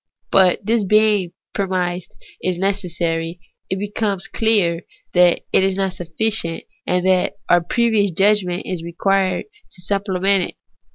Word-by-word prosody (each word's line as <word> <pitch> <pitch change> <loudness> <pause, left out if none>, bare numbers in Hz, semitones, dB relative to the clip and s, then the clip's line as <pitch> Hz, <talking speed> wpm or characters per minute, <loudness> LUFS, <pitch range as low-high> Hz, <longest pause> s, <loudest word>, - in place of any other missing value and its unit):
But 190 0 +4
this 225 0 +2
being 210 -3 +3 0.2
premised 185 -2 -2 0.3
as 180 -1 0
necessary, 175 -3 -2 0.3
it 190 - -1
becomes 205 -1 -2
clear 200 -7 +2 0.3
that 180 -1 +4
it - - +5
is 190 0 +1
not 195 -1 -1
sufficient, 175 0 -2 0.2
and 180 0 +1
that 185 -1 +2 0.2
our 175 - +5
previous 220 +1 +1
judgment 190 0 +1
is 180 -3 -4
required 190 +2 0 0.3
to 180 - -11
supplement 195 -1 +1
it. - - -13
190 Hz, 130 wpm, -20 LUFS, 175-200 Hz, 0.3 s, it